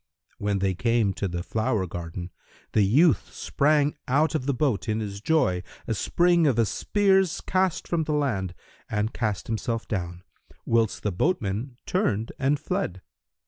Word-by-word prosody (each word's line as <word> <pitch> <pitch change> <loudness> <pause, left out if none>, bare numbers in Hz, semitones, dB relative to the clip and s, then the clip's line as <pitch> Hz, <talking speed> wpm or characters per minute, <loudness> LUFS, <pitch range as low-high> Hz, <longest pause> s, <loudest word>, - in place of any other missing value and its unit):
When 100 -2 0
they 95 0 +1
came 115 0 +1
to 100 - -2
the 85 -1 -4
flower 110 -1 0
garden, 85 0 -6 0.4
the 110 - +3
youth 130 - +3
sprang 145 0 +1
out 150 +6 +2
of 145 -4 -2
the - - +3
boat, 120 -9 0
in 110 0 0
his 100 -2 -5
joy, 110 - +2 0.2
a 115 - -1
spring 170 - +3
of 130 -5 +2
a 115 - +4
spear's 190 - +2
cast 185 -2 0
from 165 -2 0
the 150 - -1
land, 100 -12 -1 0.3
and 110 +1 -1
cast 105 -5 -2
himself 115 +1 -2
down, 90 -3 -4 0.4
whilst 115 -2 +1
the 105 - 0
boatman 120 - -1
turned 115 - 0
and 140 +2 +2
fled. 95 - -3
115 Hz, 160 wpm, -26 LUFS, 100-150 Hz, 0.4 s, a